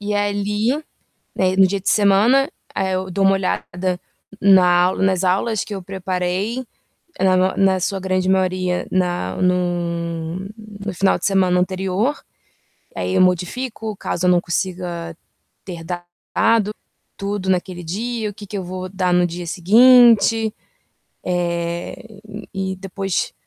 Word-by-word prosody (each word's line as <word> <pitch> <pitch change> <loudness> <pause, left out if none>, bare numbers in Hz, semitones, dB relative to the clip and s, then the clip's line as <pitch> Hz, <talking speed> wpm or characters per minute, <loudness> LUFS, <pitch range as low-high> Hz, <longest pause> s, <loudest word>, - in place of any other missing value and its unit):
E 205 0 -3
ali, 205 +3 0 0.6
né, 185 0 +1
no 190 - +7
dia 195 +1 -2
de 190 - -1
semana, 215 +7 +4 0.3
eh, 190 -1 0
eu 185 0 -3
dou 195 +2 0
uma 195 - +5
olhada 185 -1 -2 0.4
na 190 -2 +6
aula 175 +2 +2
nas 190 -1 +2
aulas 195 +3 +1
que 210 - -8
eu 195 - -6
preparei. 190 +5 -2 0.5
Na 185 -1 +3
ma 185 +1 +1
na 190 -1 +3
sua 195 +2 -2
grande 185 0 0
maioria, 185 -1 0
na 175 - -1
no 170 -2 -1 0.5
no 205 - -3
final 195 +2 +2
de 175 - -5
semana 185 -2 +3
anterior. 190 +8 0 0.8
Aí, - - -2
eu 185 - +4
modifico 215 +5 -1
caso 180 -2 -3
eu - - +5
não 175 -1 +3
consiga 175 -2 -3 0.5
ter 175 -3 -7
dado 185 +5 -1 0.5
tudo 200 -1 -3
naquele 180 -1 -1
dia, 220 +5 -3
o - - -13
que 205 0 -10
que 205 - -5
eu 185 - -5
vou 185 +1 -6
dar 185 -1 0
no 180 0 +4
dia 175 0 -6
seguinte. 225 +3 +5 0.7
Eh, 175 +4 -3 0.3
e 190 0 -3
depois 195 0 -3
185 Hz, 145 wpm, -20 LUFS, 180-200 Hz, 0.8 s, no